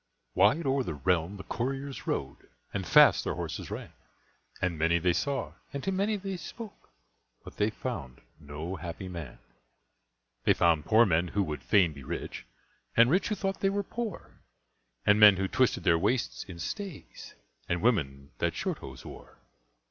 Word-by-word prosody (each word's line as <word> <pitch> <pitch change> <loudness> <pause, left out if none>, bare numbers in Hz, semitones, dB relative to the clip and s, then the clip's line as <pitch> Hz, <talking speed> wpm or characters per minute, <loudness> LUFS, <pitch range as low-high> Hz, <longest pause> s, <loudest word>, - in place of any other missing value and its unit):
Wide 110 - +4
o'er 135 0 +2
the 85 -11 -4
realm 85 +6 0
the 95 - -8
couriers 135 +3 -4
rode, - - -3 0.2
And - - -3
fast - - +7
their - - -2
horses - - -5
ran, - - -7 0.7
And 90 -2 0
many 85 +2 +3
they 90 +1 +2
saw, 130 - -2 0.2
and 140 -1 -5
to 195 - 0
many 200 +3 +1
they 195 -2 -4
spoke, 220 +4 -10 0.5
But - - -12
they 105 - +2
found 85 - -6 0.2
no 80 +5 -6
Happy 85 +3 -6
Man. 85 -8 -7 1.1
They - - +4
found 80 -3 +3
poor 115 +2 +6
men 85 -1 +2
who 100 +3 0
would 75 -4 -4
fain 90 -6 +3
be 70 -2 -11
rich - - -6 0.5
And 120 +2 +6
rich 185 +3 +2
who 210 - -1
thought 195 -1 -2
they 195 - +2
were 200 +1 -1
poor; 225 -1 -6 0.6
And 105 +1 +5
men 105 -3 +9
who 95 0 0
twisted - - +1
their 85 - +4
waists 115 +7 0
in 90 -3 -9
stays, 195 - -7 0.3
And 85 +2 -1
women 70 - 0
that - - 0
shorthose - - -5
wore. - - -12
100 Hz, 170 wpm, -29 LUFS, 85-140 Hz, 1.1 s, men